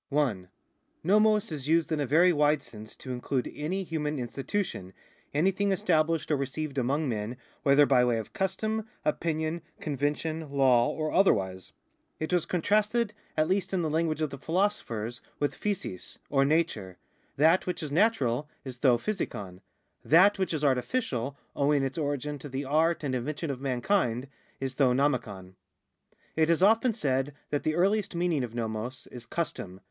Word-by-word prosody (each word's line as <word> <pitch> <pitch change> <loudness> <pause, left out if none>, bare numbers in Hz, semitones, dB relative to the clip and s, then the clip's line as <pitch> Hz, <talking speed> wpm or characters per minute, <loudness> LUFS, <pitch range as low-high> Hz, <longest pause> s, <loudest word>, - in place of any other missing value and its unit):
1. 125 -11 0 0.6
No/ioc 210 +2 +3
is 145 -3 -5
used 165 +1 +2
in 155 - 0
a 145 - 0
very 170 +6 +5
wide 150 -1 +2
sense 110 -1 -11
to 130 - -8
include 125 +1 -2
any 180 +6 -2
human 155 -3 -2
institution, 130 - -3 0.4
anything 190 +6 +1
established 165 -5 +1
or - - +4
received 140 +1 -3
among 140 +5 0
men, 115 0 -3 0.2
whether 140 +1 +5
by 130 -3 +4
way 120 -2 +2
of 110 - -6
custom, 215 +3 -1 0.2
opinion, 160 +1 -1 0.2
convention, 150 +2 -2
law 130 -4 +4
or 155 -1 -2
otherwise. 95 - +2 0.5
It 155 +3 -3
was 175 -3 +1
contrasted, 210 +5 +1 0.2
at 155 0 +3
least 190 +1 0
in 175 - 0
the 155 - -1
language 160 -1 0
of 150 - -1
the 140 - -7
philosophers, 145 - -1 0.2
with 145 - 0
(jtvaic, 195 - -4
or 135 -1 +4
nature. 140 - 0 0.4
That 160 +7 +4
which 180 - -3
is 150 - -5
natural 150 - +2 0.2
is 125 -2 -7
to 140 - +3
fvaiKor; 105 - -4 0.4
that 195 +6 +5
which 190 -3 0
is 155 -2 -2
ai'tificial, 135 - 0 0.2
owing 140 0 +2
its 135 +4 -2
origin 145 0 -2
to 145 - -8
the 135 +2 -3
art 160 +4 +2
and 135 -3 -1
invention 145 +5 -2
of 130 -1 -6
mankind, 130 - 0 0.3
is 135 -1 -3
to 135 +1 +3
j'o/itvoj'. 115 -9 -1 0.8
It 160 0 +3
is 170 +2 +3
often 225 +3 +4
said 140 - -1 0.2
that 145 - 0
the 155 - 0
earliest 195 +1 +1
meaning 170 -5 +1
of 120 -2 -5
vouoq 115 +2 -4
is 120 -2 -10
custom. 100 - -4
150 Hz, 165 wpm, -28 LUFS, 130-170 Hz, 0.8 s, very